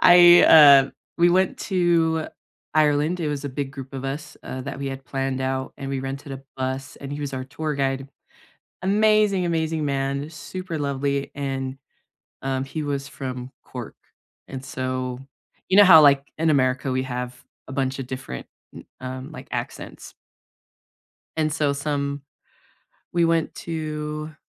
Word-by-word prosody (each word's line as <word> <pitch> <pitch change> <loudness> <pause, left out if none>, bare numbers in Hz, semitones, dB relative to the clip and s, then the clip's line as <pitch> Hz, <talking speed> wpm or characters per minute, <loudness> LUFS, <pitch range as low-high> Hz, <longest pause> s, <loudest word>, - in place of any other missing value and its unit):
I, 175 0 +9
uh 140 -3 +8 0.3
we 175 +1 +6
went 185 +1 +2
to 165 -3 +1 0.5
Ireland. 155 +3 +3
It 155 - -1
was 145 -1 -3
a 145 - -2
big 135 0 -4
group 135 0 -9
of 135 0 -5
us, 140 +3 -5
uh, 130 - -5
that 140 0 -6
we 140 - -4
had 135 0 -7
planned 135 -1 -2
out, 130 0 -2
and 135 0 -6
we 135 - -1
rented 135 +2 -6
a 135 0 -7
bus, 130 +1 -4
and 140 0 -7
he 145 - -5
was 140 -2 -4
our 130 - -3
tour 150 +2 -4
guide. 135 0 -1 0.8
Amazing, 210 -1 +3
amazing 160 -2 0
man. 140 +1 -1
Super 170 +1 -6
lovely. 140 0 -1
And, 135 -1 -3 0.6
um, 135 0 -1
he 155 +3 -4
was 140 -1 -3
from 130 -2 -6
Cork. - - -8 0.5
And 135 -1 -6
so, 130 -1 -3 0.5
you 190 - +4
know 205 - +10
how, 160 -4 +10
like, 140 -1 +4
in 160 0 +2
America, 130 -1 +2
we 130 0 0
have 125 -1 -5 0.2
a - - -8
bunch 135 -1 -1
of 125 - -5
different, 130 - -6 0.3
n - - -10 0.2
um, 130 +3 -6
like, - - -10
accents? - - -6 1.2
And 155 -1 +1
so 145 -2 +1
some 140 -1 -2 0.9
we 170 -1 +3
went 165 -1 +1
to, 155 -1 -5
140 Hz, 160 wpm, -24 LUFS, 135-155 Hz, 1.2 s, know